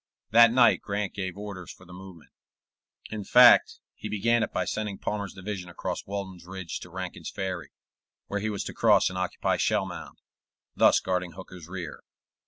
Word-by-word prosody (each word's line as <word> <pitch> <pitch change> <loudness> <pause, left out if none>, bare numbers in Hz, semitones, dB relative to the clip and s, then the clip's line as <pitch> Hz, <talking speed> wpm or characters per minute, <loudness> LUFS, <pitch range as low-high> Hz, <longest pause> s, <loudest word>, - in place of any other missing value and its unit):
That 115 +1 +7
night 120 -1 +5
Grant 100 -1 -3
gave 95 -2 -4
orders 100 -3 -7
for 95 - -16
the 90 - -13
movement; 90 -3 -12 0.8
in 110 -1 -4
fact, 125 +4 +7 0.2
he 105 - -7
began 115 +3 +2
it - - -1
by - - -1
sending 105 -2 -3
Palmer's 100 -2 -4
division 95 -2 -6
across 85 - -5
Walden's 95 -3 -6
Ridge 95 -3 -6
to 90 - -11
Rankin's 95 +1 -6
Ferry, 95 -3 -4 0.6
where 105 - -3
he 110 +2 -2
was 105 -2 -3
to - - -6
cross - - +4
and 90 - -6
occupy 95 -1 -1
Shellmound, - - -2 0.6
thus - - +5
guarding 90 -2 -2
Hooker's 90 -3 -11
rear. 90 -4 -7
95 Hz, 170 wpm, -27 LUFS, 90-105 Hz, 0.8 s, That